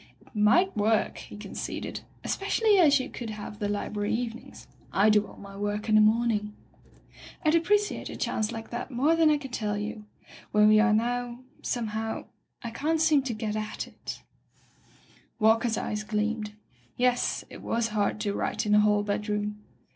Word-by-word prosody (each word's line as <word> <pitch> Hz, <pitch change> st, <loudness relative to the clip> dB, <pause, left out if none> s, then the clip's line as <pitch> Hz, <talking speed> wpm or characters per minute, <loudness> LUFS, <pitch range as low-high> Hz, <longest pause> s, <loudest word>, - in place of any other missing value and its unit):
"It -, -, -23 dB
might 275 Hz, -, +4 dB
work," 215 Hz, +1 st, +1 dB
he -, -, -10 dB
conceded, 205 Hz, -2 st, -5 dB, 0.2 s
"espe 390 Hz, -, -3 dB
cially 425 Hz, -2 st, +4 dB
as 295 Hz, -5 st, +6 dB
you 255 Hz, -, -3 dB
could 235 Hz, -3 st, -7 dB
have 210 Hz, 0 st, -7 dB
the 205 Hz, -2 st, -1 dB
library 205 Hz, 0 st, -2 dB
evenings. 235 Hz, -1 st, -6 dB, 0.2 s
I 205 Hz, +3 st, +4 dB
do 210 Hz, -1 st, +3 dB
all -, -, -14 dB
my 200 Hz, 0 st, -11 dB
work 205 Hz, +2 st, -3 dB
in -, -, +3 dB
the 215 Hz, -, +7 dB
morning." 215 Hz, -1 st, +2 dB, 0.9 s
"Fd 310 Hz, +1 st, +4 dB
appreciate 410 Hz, +5 st, +1 dB
a -, -, -6 dB
chance 215 Hz, -1 st, -1 dB
like 225 Hz, 0 st, -7 dB
that 240 Hz, +2 st, -4 dB
more 280 Hz, +6 st, +2 dB
than 325 Hz, -1 st, +5 dB
I 300 Hz, -, +4 dB
can 270 Hz, -3 st, -8 dB
tell 210 Hz, -4 st, -2 dB
you. 210 Hz, +1 st, -5 dB, 0.5 s
Where 210 Hz, 0 st, +5 dB
we 215 Hz, 0 st, +6 dB
are 225 Hz, +1 st, +4 dB
now, 240 Hz, +2 st, 0 dB, 0.2 s
some 235 Hz, -3 st, -2 dB
how 220 Hz, 0 st, -3 dB, 0.2 s
— -, -, -27 dB
I 235 Hz, -, -4 dB
can't 310 Hz, +7 st, 0 dB
seem 310 Hz, -3 st, +4 dB
to 260 Hz, -3 st, -3 dB
get 215 Hz, -1 st, -3 dB
at 215 Hz, 0 st, -3 dB
it -, -, -9 dB, 0.6 s
" -, -, -30 dB
Walker's 225 Hz, +1 st, +3 dB
eyes 210 Hz, 0 st, -2 dB
gleamed. 215 Hz, 0 st, -2 dB, 0.4 s
Yes, 245 Hz, 0 st, +1 dB
it -, -, -10 dB
was 230 Hz, 0 st, 0 dB
hard 210 Hz, 0 st, 0 dB
to 205 Hz, -, -1 dB
write 220 Hz, -, -1 dB
in 210 Hz, -, +2 dB
a 210 Hz, -, +7 dB
hall 210 Hz, -1 st, +3 dB
bedroom. 210 Hz, 0 st, -2 dB
220 Hz, 185 wpm, -28 LUFS, 210-245 Hz, 0.9 s, the